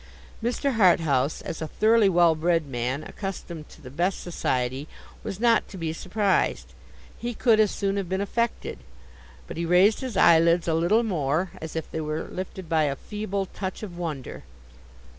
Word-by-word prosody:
Mr. 245 +2 0
Harthouse, 160 - +3
as 165 - -6
a 160 - -2
thoroughly 220 +3 +4
well 175 -2 +5
bred 165 0 +1
man, 130 +2 -3
accustomed 170 -4 -7
to - - -16
the 125 - -9
best 175 +7 0
society, 130 -4 -2 0.4
was 200 -3 -5
not 230 -1 +3
to 195 - -10
be 165 -2 -3
surprised—he 215 +4 -2
could 225 -2 +3
as 215 -1 +5
soon 200 0 -1
have 195 -3 -3
been 190 +1 -1
affected—but 65 - -5
he 170 - -1
raised 180 +5 +4
his 260 -3 -4
eyelids 170 +1 +5
a 165 - +2
little 175 +8 +3
more, 170 -3 0
as 160 0 -7
if 160 - -4
they 160 - -3
were 155 +1 -3
lifted 185 -1 -6
by 160 -2 +2
a 140 -1 -1
feeble 200 +3 -4
touch 190 +2 -6
of 185 -5 -7
wonder. 155 -7 -5
175 Hz, 165 wpm, -25 LUFS, 155-200 Hz, 0.4 s, well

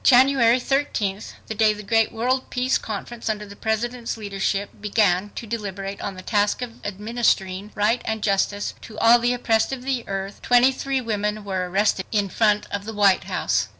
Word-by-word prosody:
January 255 -2 +5
thirteenth, 225 -7 -1
the - - -5
day 215 0 +3
the 210 0 -9
great 225 +1 +2
world 250 +3 -1
Peace 255 +1 +1
Conference 225 +2 -5
under 210 -1 -2
the 200 0 -11
President's 230 +3 -2
leadership, 200 -1 -2
began 205 -2 +2
to - - -5
deliberate 200 -3 -5
on 195 - -4
the 185 - -10
task 205 +4 +1
of 230 -2 -9
administering 205 -2 -1
"right" 220 +4 +2
and 220 -1 -3
"justice" 205 0 0
to 220 - -11
all 235 +1 +6
the 240 +1 +1
oppressed 235 -2 +1
of 260 -2 -5
the 260 -3 -1
earth, 195 0 -5
twenty 245 +2 +5
three 270 0 -2
women 210 -2 -2
were 190 -2 -2
arrested 195 0 +1
in 205 -3 +1
front 210 0 +2
of 200 0 -3
the 225 - -5
White 200 -3 +3
House. - - 0
215 Hz, 185 wpm, -23 LUFS, 200-240 Hz, -, all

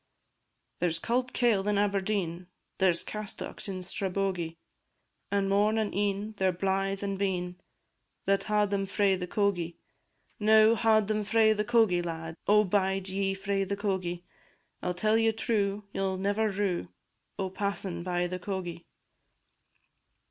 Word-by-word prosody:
There 175 - +2
's 165 - -1
cauld 245 +7 -1
kail 215 -5 +2
in 210 -1 +2
Aberdeen, 195 -3 0 0.3
There 190 -1 +5
's 170 - -1
castocks 210 0 -5
in 185 -2 -4
Strabogie; 185 -3 -2 0.7
And 200 -1 +1
morn 205 +3 +3
and 215 -2 0
e'en, 205 +2 -1
they 190 - +2
're - - +3
blythe 195 +2 -1
and 195 -1 -2
bein, 180 -2 -2 0.6
That 195 0 +2
haud 210 -1 +2
them 195 -1 0
frae 200 0 +2
the 180 -1 -4
cogie. 180 -4 0 0.6
Now, 220 +1 +6
haud 220 -2 +3
ye 215 0 0
frae 220 +1 +4
the 210 0 -1
cogie, 220 -6 +3
lads; 165 -1 -5
O 210 +1 +6
bide 195 -1 0
ye 195 0 0
frae 195 0 -1
the 200 +1 -3
cogie! 185 -4 -2 0.6
I - - -4
'll 180 - -1
tell 215 +4 +2
ye 225 0 +4
true, 210 -2 -1
ye - - -2
'll 190 -1 0
never 205 +3 +1
rue, 195 -3 -1 0.5
O' 190 -1 -2
passin' 195 -3 -2
by 175 0 -1
the 180 +1 -4
cogie. 180 -3 -5
195 Hz, 155 wpm, -29 LUFS, 185-210 Hz, 0.7 s, Now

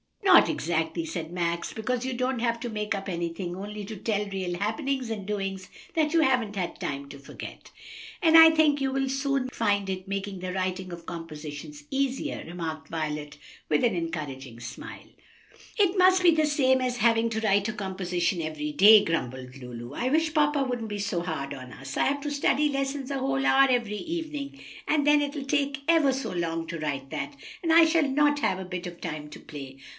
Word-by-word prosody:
"No, 385 -2 +6
not - - +5
exactly," 165 +1 -1
said 160 0 -5
Max; 170 -1 -2
"because 245 +3 -2
you 260 - -2
don't 255 0 -1
have 235 0 0
to 240 - -3
make 210 -1 -2
up 195 0 -5
anything, 175 0 -3
only 205 +2 -6
to 220 +2 -7
tell 210 +1 -1
real 185 -3 -3
happenings 255 - -2
and 205 -3 -5
doings 195 -2 -3 0.3
that 310 -1 +1
you 330 - +5
haven't 250 -7 +2
had 185 -3 -3
time 140 0 -4
to 140 0 -10
forget." 140 - -10 0.5
"And 325 -1 +5
I 325 0 +11
think 310 -2 +3
you 270 -1 +1
will 270 0 0
soon 270 -1 0
find 205 -5 0
it 185 0 -4
making 195 -1 -4
the 180 0 -4
writing 185 0 -2
of 170 -1 -9
compositions 165 - -8
easier," 275 +1 -1
remarked 165 -3 -5
Violet, 150 -2 -4 0.3
with 150 - +2
an 235 -4 +3
encouraging 145 -8 -5
smile. 120 +1 -9 0.7
"It'll 395 -4 +4
be - - 0
just 370 0 +5
the 320 -3 +5
same 260 -3 +3
as 250 -1 -1
having 230 -1 +3
to 220 0 -1
write 205 -1 +2
a 220 - -2
composition 185 -3 -1
every 155 -1 -3
day," 205 +7 +8
grumbled 130 -5 -3
Lulu. 125 -1 -8
"I 240 - -2
wish 315 +2 +2
papa 295 -2 +3
wouldn't 245 -4 -3
be 205 - -3
so 195 -4 -1
hard 155 -5 -4
on 130 -2 -9
us. 135 0 -7
I - - +3
have 285 +1 0
to 295 0 -3
study 290 +1 +2
lessons 275 0 -2
a 275 - -1
whole 270 0 0
hour 270 0 +6
every 235 -5 +1
evening, 305 -3 -5 0.3
and 295 -2 +2
then 295 0 +5
it'll 285 -1 -3
take 275 0 0
ever 325 -5 +5
so 265 +1 -3
long 165 -2 -2
to 165 0 -5
write 140 -3 -3
that, 285 0 -4 0.3
and 330 -3 0
I 330 0 +8
shall 320 -2 +3
not 290 +1 +3
have 190 - +1
a 190 - -5
bit 180 0 -5
of 175 -1 -9
time 150 -3 -5
to - - -10
play." 135 -3 -9
210 Hz, 205 wpm, -27 LUFS, 170-275 Hz, 0.7 s, I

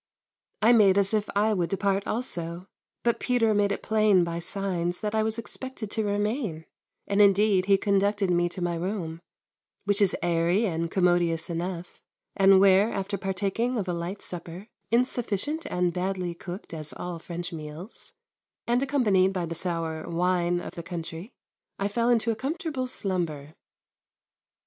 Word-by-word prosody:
I 235 +3 +7
made 200 -4 +5
as 200 +1 +3
if 215 -1 0
I 215 +2 +3
would 175 -4 0
depart 195 0 0
also, 175 -7 -3 0.4
but 235 -1 +1
Peter 230 -3 +2
made 205 -1 +2
it 200 - -3
plain 215 -4 +4
by 170 0 -3
signs 175 -1 -2
that 210 -1 -2
I 220 - +2
was 220 +1 0
expected 230 0 -5
to 220 - 0
remain, 205 - -1 0.4
and 200 +1 +2
indeed 200 -1 +4
he 200 -1 +5
conducted 200 0 +1
me 175 0 +2
to 175 +1 -5
my 175 0 0
room, 170 -2 -4 0.6
which 205 +1 +2
is 200 - +3
airy 175 +5 +2
and 165 -3 -1
commodious 175 -2 +2
enough, 175 +1 -5 0.3
and 195 -1 +6
where, 195 +3 +5
after 195 +1 -2
partaking 200 +6 -1
of 200 -4 -2
a 180 - -1
light 175 +4 -5
supper, 175 +4 -7 0.2
insufficient 245 - 0
and 180 -1 0
badly 185 -1 -2
cooked 175 +2 -8
as 155 -2 -5
all 175 -1 -6
French 175 +1 -6
meals, 155 +6 -8 0.5
and 240 +2 +2
accompanied 210 -9 +2
by 180 -2 -1
the 165 - -4
sour 165 -2 -3
"wine" 175 0 +1
of - - -7
the 170 - -6
country, 170 +4 -6 0.5
I 200 - 0
fell 235 +3 0
into 230 -1 +3
a - - -2
comfortable 285 - -3
slumber. 170 - -3
195 Hz, 160 wpm, -27 LUFS, 175-215 Hz, 0.6 s, I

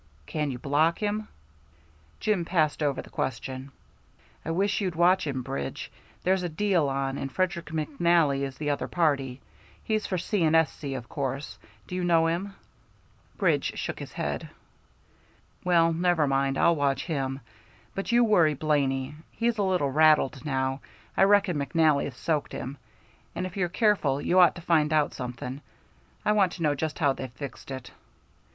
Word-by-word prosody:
"Can 150 - -2
you 130 - -4
block 150 +6 +2
him?" 210 0 -2 0.9
Jim 210 -5 +1
passed 160 -3 +1
over 145 -2 0
the - - -15
question. 130 +2 -4 0.7
"I - - -5
wish 195 +6 +1
you'd 185 -4 -2
watch 175 +1 +3
him, 130 -3 -2
Bridge. 70 - -5 0.3
There's 190 +1 +2
a 175 - -2
deal 170 -3 +1
on, 135 0 -2
and 135 - -4
Frederick 175 -2 -1
McNally 155 -1 +1
is 135 -1 -4
the 150 0 -1
other 145 - -2
party. 140 -6 0 0.4
He's 215 -1 -1
for 185 - -1
C. 185 +1 0
& 155 +1 +3
S.C. 155 -3 +1
of 120 -2 -6
course. 135 +1 -4 0.3
Do - - -10
you 180 0 -1
know 165 -2 +4
him?" 180 +5 -2 0.8
Bridge - - +1
shook - - -4
his - - -8
head. - - -3 1.1
"Well, 170 -2 +4
never 170 -2 +2
mind. 135 0 +1
I'll 170 - +4
watch 140 -2 0
him. 135 -5 -2 0.5
But 195 +4 -3
you 240 0 +5
worry 175 -9 +4
Blaney. 140 -2 0 0.2
He's 230 -1 -1
a - - +3
little 180 -8 +1
rattled 150 -3 +4
now, 135 -2 -1 0.3
I 195 - +5
reckon 200 -4 +3
McNally's 145 -2 +1
soaked 155 -3 -1
him, 135 +3 -5 0.6
and - - -2
if 185 - -7
you're 185 -3 0
careful 175 - +2
you 180 +5 +2
ought 180 - +6
to 175 - -8
find 160 -3 +2
out 150 -1 +2
something. 125 +2 -6 0.6
I - - +4
want 195 -4 +3
to 170 - -5
know 150 -2 +3
just 155 +2 -3
how 145 -4 +3
they've 130 -1 -6
fixed 135 +1 -8
it." 130 -2 -7
155 Hz, 170 wpm, -27 LUFS, 135-180 Hz, 1.1 s, ought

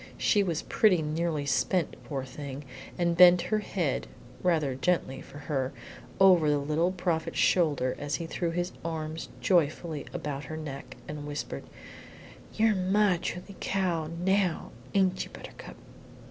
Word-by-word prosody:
She 205 - +3
was 170 -5 -1
pretty 185 -7 +3
nearly 155 -1 -1
spent, 160 +5 +1
poor 135 -3 -4
thing, 140 +1 -7 0.3
and 170 -1 +1
bent 180 0 +8
her 215 - +4
head 175 -9 -2 0.3
(rather 160 -7 +2
gently 135 -2 0
for - - -12
her) 140 -3 -2 0.5
over 180 -5 +6
the 145 - +3
Little 155 +5 +1
Prophet's 175 -3 -2
shoulder 145 -8 +2
as 145 0 -2
he 170 - -4
threw 170 +1 -2
his 175 +2 -2
arms 160 -1 -4
joyfully 160 -3 +1
about 145 -1 -4
her 155 - -6
neck, 140 -3 -7
and 150 -1 -6
whispered, 145 0 -5 0.9
"You're 220 0 +4
my 190 0 +3
truly 180 +3 -5
cow 175 -5 0 0.2
now, 190 -3 +1 0.2
ain't 185 -1 +3
you, - - -10
Buttercup?" - - -10
165 Hz, 145 wpm, -29 LUFS, 145-180 Hz, 0.9 s, bent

